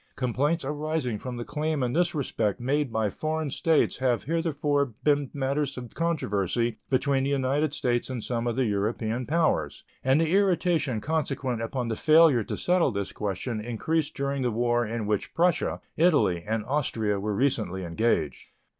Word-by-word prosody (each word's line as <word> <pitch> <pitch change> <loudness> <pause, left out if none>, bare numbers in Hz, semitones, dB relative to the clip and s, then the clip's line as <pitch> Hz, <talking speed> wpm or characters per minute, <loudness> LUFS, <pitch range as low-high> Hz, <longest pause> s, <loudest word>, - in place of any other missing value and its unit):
Complaints 140 +5 0
arising 150 -5 -2
from 125 -1 -6
the 120 - -5
claim 150 -1 -1
in 125 -1 -1
this 175 +1 +1
respect 110 -7 -1
made 135 +2 0
by 110 -2 0
foreign 155 +2 -2
states 160 +2 +2
have 125 -5 +1
heretofore 145 -5 0
been 145 -2 +2
matters 140 0 -1
of 125 -2 -8
controversy 115 - -1
between 135 0 +2
the 135 - 0
United 140 +2 +1
States 120 -4 -1
and 125 -4 -4
some 120 -1 -2
of 120 - -1
the 130 0 +1
European 110 +3 -1
powers, 160 +1 0 0.2
and 130 +3 +4
the 165 -1 +1
irritation 175 - +2
consequent 135 -6 -1
upon 120 +2 -2
the 115 - -1
failure 155 -4 +5
to - - -5
settle 180 -3 +2
this 100 -2 -3
question 105 +3 -3
increased 145 +7 -1
during 140 0 -2
the 125 - +1
war 120 +1 +1
in 115 0 -3
which 105 -1 -2
Prussia, 175 0 +1 0.2
Italy, 110 - +3
and 110 0 -1
Austria 115 -8 0
were 105 +1 -2
recently 110 -8 0
engaged. 85 -4 0
130 Hz, 165 wpm, -27 LUFS, 115-150 Hz, 0.2 s, failure